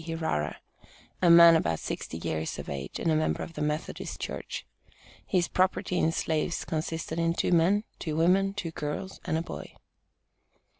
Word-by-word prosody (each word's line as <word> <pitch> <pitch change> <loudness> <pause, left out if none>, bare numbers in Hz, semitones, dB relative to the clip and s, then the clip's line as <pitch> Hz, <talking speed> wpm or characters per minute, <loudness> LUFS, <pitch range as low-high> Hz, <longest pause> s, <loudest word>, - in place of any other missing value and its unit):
Hirara, 160 - -2 0.7
a 175 - +5
man 170 0 +9
about 85 - +1
sixty 80 - -5
years 80 -1 -3
of - - -7
age, 70 -1 -5
and 165 - +1
a - - +3
member 155 0 0
of 165 - -8
the - - -5
Methodist 150 +2 -3
Church. - - -5 0.6
His 180 -3 +2
property 185 0 +1
in 160 - +3
slaves 160 +1 -1
consisted 160 +1 -3
of 165 0 +1
two - - +1
men, 180 +5 +4 0.2
two 155 -2 -3
women, 190 +4 +3
two 175 -5 -3
girls 155 +5 -5
and 160 - 0
a 165 - -1
boy. - - -8
165 Hz, 165 wpm, -28 LUFS, 155-175 Hz, 0.7 s, man